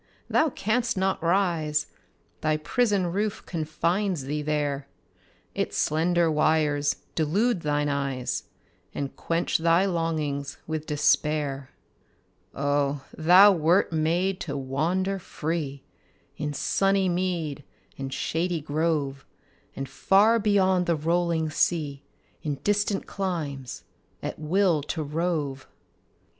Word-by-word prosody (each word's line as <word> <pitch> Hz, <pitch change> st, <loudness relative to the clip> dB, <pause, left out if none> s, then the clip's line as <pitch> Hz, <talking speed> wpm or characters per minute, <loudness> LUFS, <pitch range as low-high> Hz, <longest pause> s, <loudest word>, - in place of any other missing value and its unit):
Thou 315 Hz, -, +4 dB
canst 235 Hz, -1 st, -1 dB
not 190 Hz, 0 st, 0 dB
rise: 165 Hz, -4 st, +1 dB, 0.6 s
Thy 155 Hz, 0 st, +1 dB
prison 195 Hz, +2 st, +1 dB
roof 205 Hz, +2 st, -2 dB
confines 170 Hz, +1 st, -1 dB
thee 150 Hz, +3 st, -2 dB
there; 145 Hz, -2 st, -1 dB, 0.7 s
Its -, -, -2 dB
slender 170 Hz, +1 st, +2 dB
wires 150 Hz, -2 st, +2 dB, 0.2 s
delude 185 Hz, +7 st, +1 dB
thine 145 Hz, -1 st, 0 dB
eyes, 135 Hz, -3 st, -2 dB, 0.5 s
And 140 Hz, -2 st, -4 dB
quench 165 Hz, 0 st, 0 dB
thy 170 Hz, +3 st, +4 dB
longings 155 Hz, -6 st, -2 dB
with 155 Hz, -1 st, -4 dB
despair. 145 Hz, -2 st, +1 dB, 0.9 s
Oh, 145 Hz, -1 st, 0 dB
thou 180 Hz, +6 st, +7 dB
wert 170 Hz, +1 st, +2 dB
made 175 Hz, +4 st, +1 dB
to -, -, -4 dB
wander 170 Hz, +9 st, -1 dB
free 155 Hz, -5 st, -4 dB, 0.5 s
In 150 Hz, 0 st, -3 dB
sunny 195 Hz, +6 st, +1 dB
mead 175 Hz, -5 st, -1 dB, 0.3 s
and 135 Hz, 0 st, -5 dB
shady 170 Hz, +4 st, -1 dB
grove, 145 Hz, -2 st, -1 dB, 0.5 s
And 135 Hz, -, -4 dB
far 200 Hz, -, +4 dB
beyond 190 Hz, -4 st, +2 dB
the 170 Hz, -, +3 dB
rolling 165 Hz, 0 st, 0 dB
sea, 150 Hz, -4 st, 0 dB, 0.4 s
In 150 Hz, -2 st, -2 dB
distant 205 Hz, -1 st, +1 dB
climes, 155 Hz, -9 st, -4 dB, 0.4 s
at -, -, -4 dB
will 170 Hz, 0 st, +2 dB, 0.2 s
to 155 Hz, -, -1 dB
rove! 150 Hz, -3 st, -2 dB
160 Hz, 110 wpm, -26 LUFS, 145-185 Hz, 0.9 s, thou